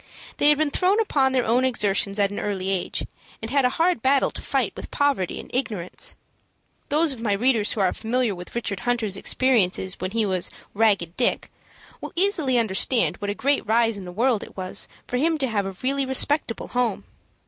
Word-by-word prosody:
They 290 - +5
had 295 - +5
been 305 -1 +1
thrown 380 +7 +2
upon 275 -11 +2
their 255 -2 +1
own 240 +3 +2
exertions 205 -5 +1
at 200 -1 +2
an 205 - -4
early 195 -2 -2
age, 185 -2 -1 0.3
and 225 +1 -6
had 275 -2 +3
a - - +4
hard 340 -6 +2
battle 270 +2 +3
to - - -7
fight - - -1
with - - -8
poverty 280 -11 0
and - - -9
ignorance. 215 -9 -3 0.7
Those 305 0 +3
of 235 - -10
my 215 -3 +1
readers 225 0 +2
who 215 - -2
are 185 - +2
familiar 235 0 0
with 180 +3 -10
Richard 210 -5 -3
Hunter's 230 -4 -1
experiences 195 -5 +1
when 185 - -2
he 220 +2 0
was 185 -3 0 0.2
"Ragged 200 -6 +2
Dick," 250 - 0 0.5
will - - -7
easily 335 -9 +2
understand 200 - +1
what 205 - -4
a 205 - -2
great 280 +4 +1
rise 230 0 +3
in 195 -2 -7
the 180 - -7
world 230 +3 +1
it - - -11
was 185 -1 -1 0.2
for 250 - -2
him 320 +4 +1
to 270 -3 -1
have 205 -4 -1
a 190 -1 -7
really 275 +1 0
respectable 265 -2 0
home. 245 -4 -1
230 Hz, 205 wpm, -24 LUFS, 200-265 Hz, 0.7 s, They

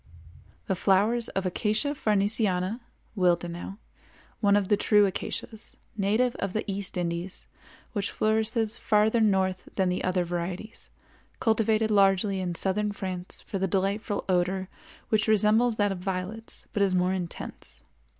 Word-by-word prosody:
The - - 0
flowers 205 +5 +2
of 195 0 -2
Acacia 215 +8 0
farnesiana 210 -4 0 0.4
(Willd.), 175 0 0 0.6
one 200 -2 +4
of 205 -2 +2
the 205 - +4
true 210 0 +4
acacias, 210 +3 -5 0.2
native 220 +5 +2
of 195 -2 -3
the 220 - -1
East 195 -2 -3
Indies, 175 +1 -3 0.5
which 205 -3 -1
flourishes 220 0 +1
farther 215 +2 +3
north 190 -3 +1
than 190 -2 +2
the 180 - -1
other 180 0 +1
varieties, 175 +5 -5 0.5
cultivated 220 -1 +2
largely 195 -1 +3
in 180 -2 -2
southern 205 +4 0
France 185 -2 -5
for 195 - -4
the 190 - +1
delightful 200 +2 -1
odor 185 +1 0 0.4
which 215 0 +2
resembles 220 +2 +3
that 205 -1 +2
of 190 - -4
violets 190 +4 -5
but 205 - 0
is 195 -2 +3
more 180 +1 +2
intense. 180 -3 -6
200 Hz, 140 wpm, -27 LUFS, 185-215 Hz, 0.6 s, one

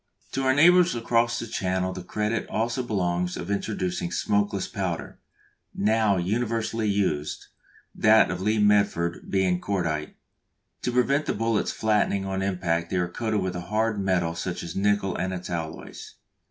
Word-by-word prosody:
To 135 - -1
our 130 0 +4
neighbours 175 +1 +6
across 115 0 +1
the - - -4
Channel 95 -3 -1
the 95 - -6
credit 105 +4 -2
also 115 +3 -1
belongs 90 -6 -1
of 90 +4 -5
introducing 95 -4 -2
smokeless 100 +1 0
powder, 95 -6 -4 0.6
now 110 -1 +2
universally 110 +3 -1
used; 90 -7 -1 0.5
that 110 0 +5
of 90 - -3
the 95 - -4
Lee 110 +1 +2
Metford 100 -5 +2
being 95 -2 +1
"cordite." 85 -6 -2 0.7
To 125 - -1
prevent 135 +4 +2
the - - 0
bullets 115 -2 0
flattening 105 -2 +1
on 95 0 -2
impact 90 -3 -1
they 95 - -1
are 90 -1 +1
coated 110 +3 -2
with 95 -1 -2
a 90 - -3
hard 110 +3 0
metal 90 -3 +1
such 90 +2 -4
as 85 -1 -7
nickel 100 -1 +1
and 95 0 -2
its 90 0 -7
alloys. 80 -2 -6
100 Hz, 160 wpm, -26 LUFS, 90-110 Hz, 0.7 s, neighbours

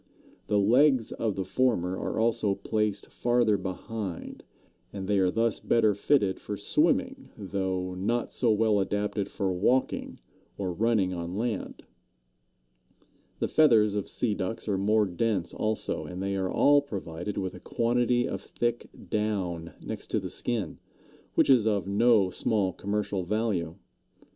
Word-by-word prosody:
The 105 - +2
legs 125 +4 +4
of 110 -4 -2
the 95 - -3
former 100 -9 +1
are - - -3
also 110 -3 +1
placed 105 0 -2
farther 120 -3 +2
behind, 95 0 -5 0.5
and 95 -2 -6
they 100 -1 +2
are 95 -1 +3
thus 115 +3 0
better 110 -3 +3
fitted 100 -2 +1
for 105 - -5
swimming, 260 - +1
though 95 -2 -2
not 110 +6 -1
so 120 - +1
well 105 -1 +3
adapted 100 +1 -1
for 95 -2 -1
walking 125 +9 0 0.4
or 95 -3 -2
running 105 -2 +1
on 85 +1 -4
land. 115 -2 -3 1.5
The - - -1
feathers 115 -9 +4
of 100 -2 -3
Sea 115 -4 -1
Ducks 105 +3 -4
are 100 - +1
more 105 +2 +2
dense 95 -1 -1
also, 110 0 -2
and 90 - -7
they 100 +1 -2
are 95 -1 -1
all 145 0 +5
provided 95 -7 -6
with 95 -2 -2
a - - -10
quantity 120 +1 +1
of 95 -6 -4
thick 120 +3 -3 0.2
down 95 -6 -2
next - - -6
to - - 0
the - - -5
skin, 115 -5 -2 0.6
which - - +4
is 125 -5 +5
of 105 -3 +1
no 100 -1 +3
small 100 -3 0
commercial 100 -1 -2
value. 95 -5 -1
105 Hz, 150 wpm, -28 LUFS, 95-115 Hz, 1.5 s, all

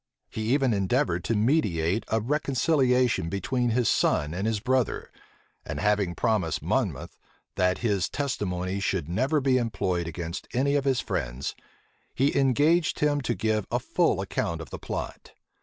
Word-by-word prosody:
He 110 +1 -2
even 135 -5 +2
endeavored 100 - +1
to 115 - +1
mediate 105 - +1
a 110 - +1
reconciliation 130 - +1
between 120 +6 -1
his 120 0 +1
son 75 +2 +2
and 95 +5 -2
his 110 -2 0
brother; 130 +2 0 0.5
and - - -5
having 105 -4 +1
promised 105 -9 0
Monmouth, - - -2 0.4
that 90 0 +2
his 100 -5 +1
testimony 100 -9 -2
should 95 -5 -1
never 130 - +1
be 130 -2 +2
employed 95 -7 -1
against 85 +1 -5
any 140 +3 +2
of 140 -1 +1
his 135 -3 +2
friends, 60 +3 -3 0.6
he 135 +2 +2
engaged 145 +5 +3
him 145 -1 +1
to 120 -2 -1
give 110 -2 0
a - - +1
full - - +1
account 85 0 -2
of 80 - -9
the - - -6
plot. - - -6
110 Hz, 155 wpm, -27 LUFS, 90-130 Hz, 0.6 s, engaged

